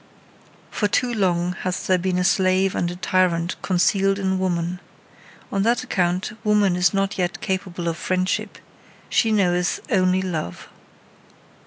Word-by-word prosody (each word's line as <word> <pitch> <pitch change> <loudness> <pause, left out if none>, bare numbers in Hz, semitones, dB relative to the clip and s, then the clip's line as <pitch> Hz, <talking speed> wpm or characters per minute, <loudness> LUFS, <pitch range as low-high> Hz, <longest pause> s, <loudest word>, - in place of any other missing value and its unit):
Far 205 - 0
too 245 +3 +1
long 180 -4 +1
hath 185 0 -3
there 185 -1 +2
been 180 0 -1
a 180 - +1
slave 185 +1 +2
and 175 - -1
a 175 - -5
tyrant 180 -2 +1
concealed 195 +1 +2
in 190 -1 -1
woman. 175 -1 -1 0.7
On 195 - 0
that 235 +4 +1
account 185 -5 -1
woman 210 -3 +3
is 180 0 +3
not 195 0 -1
yet 180 0 -1
capable 185 -2 -3
of 165 0 -1
friendship: 185 +1 -1 0.5
she 225 - +2
knoweth 180 -4 +1
only 185 -2 +2
love. 160 - -5
185 Hz, 145 wpm, -22 LUFS, 180-195 Hz, 0.7 s, woman